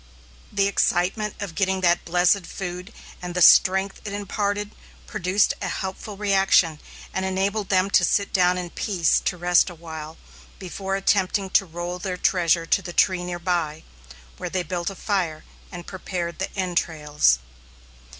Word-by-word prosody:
The 200 -1 +2
excitement 200 +2 0
of 200 -5 -5
getting 190 0 0
that 175 -1 +2
blessed 180 +2 +2
food, 180 +2 -6 0.3
and 180 0 -6
the 180 - 0
strength 190 +3 +5
it 210 - -6
imparted, 205 0 -2 0.3
produced 200 -1 +1
a 190 - -2
helpful 190 +3 -5
reaction, 195 -6 +3 0.3
and 190 - -2
enabled 195 +2 -1
them 190 0 +2
to 180 - +5
sit 200 +3 +1
down 180 -1 +3
in 175 -1 -5
peace 180 -6 +1
to 180 - -2
rest 175 +1 +3
a 175 - -10
while, 160 -1 -8 0.4
before 195 +1 -4
attempting 195 0 +1
to 195 -1 +3
roll 175 +2 -5
their 180 0 -4
treasure 170 -3 +2
to 190 - +2
the 175 -1 -8
tree 185 0 +2
near 175 0 -4
by, 170 -3 -2 0.5
where - - -5
they 185 -1 -1
built 175 +1 -3
a 195 - -8
fire 180 -7 -2 0.3
and 175 -2 -8
prepared 180 -2 -5
the 190 - -3
entrails. 160 - +1
185 Hz, 160 wpm, -24 LUFS, 175-195 Hz, 0.5 s, strength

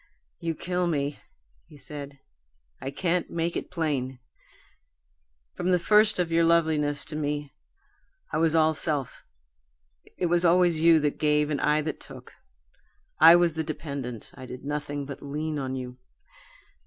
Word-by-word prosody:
"You 165 -2 -2
kill 180 +2 -1
me!" 145 -3 -1 0.5
he 150 - -15
said. 140 0 -8 0.6
"I 135 - -3
can't 175 +4 -1
make 170 0 -2
it - - -4
plain. 145 -7 -2 1.4
From 180 - -2
the 180 - +4
first 210 +4 +4
of 175 -2 -1
your 165 0 +3
loveliness 155 -3 +2
to 155 - -6
me, 145 -1 -3 0.8
I - - +1
was 165 0 +2
all 160 0 +4
self. 145 -4 -2 0.9
It - - 0
was 175 0 +2
always 175 -2 +4
you 165 -1 +6
that 150 -1 -1
gave 150 0 +2
and 145 - -1
I 150 +1 +2
that 155 0 -4
took. - - -11 0.9
I 165 +2 +10
was 175 -2 +3
the 160 0 -2
dependent 140 -6 -6
I 130 - -10
did 125 +2 -9
nothing 145 -1 -3
but 140 -1 -8
lean 150 +2 -3
on 130 -1 -3
you. 125 -1 -7
155 Hz, 155 wpm, -27 LUFS, 145-170 Hz, 1.4 s, I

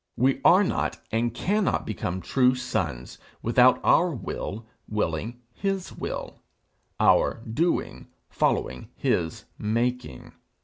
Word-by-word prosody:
We 130 +2 +2
are 185 +4 +7
not - - -1
and 115 +1 +1
cannot 200 - 0
become 95 -3 -3
true 130 +3 +3
sons 65 - -3 0.2
without 125 +2 +5
our 180 - +4
will 110 0 -5 0.2
willing 105 +4 -2
his 195 +2 -3
will, - - -6 0.6
our 115 - +3
doing 160 +10 -1 0.2
following 65 0 -1
his 80 -2 -1
making. 120 - -2
120 Hz, 105 wpm, -26 LUFS, 105-130 Hz, 0.6 s, are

